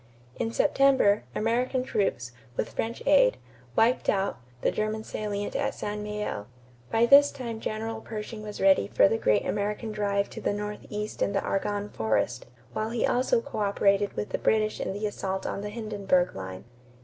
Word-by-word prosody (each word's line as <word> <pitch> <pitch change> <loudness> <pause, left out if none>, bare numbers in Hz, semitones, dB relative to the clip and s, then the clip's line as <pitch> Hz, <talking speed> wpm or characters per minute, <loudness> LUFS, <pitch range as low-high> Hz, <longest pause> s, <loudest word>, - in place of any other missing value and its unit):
In 225 - -1
September, 265 -6 +3
American 245 +3 +1
troops, 190 - -1 0.3
with - - -1
French 230 +1 -3
aid, - - +5 0.4
"wiped 235 +3 +3
out" 195 0 0 0.2
the - - +2
German 215 0 -2
salient 205 -2 -4
at - - -1
St. 210 0 -4
Mihiel. 210 - -4 0.4
By 225 +1 +3
this 280 +3 +8
time 235 -4 -5
General 220 +1 -4
Pershing 215 0 -6
was 210 -1 -7
ready 190 - +4
for 100 - +5
the 110 - 0
great 105 -1 +2
American 210 +2 -2
drive 200 -1 0
to - - -7
the - - 0
northeast 210 0 -5
in 200 - +1
the 195 - 0
Argonne 205 +1 -1
forest, 110 +2 -1 0.3
while 215 - -1
he 235 0 0
also 360 - +2
coöperated 200 - +1
with 210 - -3
the - - -2
British 215 -1 +1
in - - -2
the 205 +2 -3
assault 190 -2 -3
on - - -3
the 205 - -4
Hindenburg 205 -5 0
line. 95 -1 -7
210 Hz, 170 wpm, -27 LUFS, 200-225 Hz, 0.4 s, this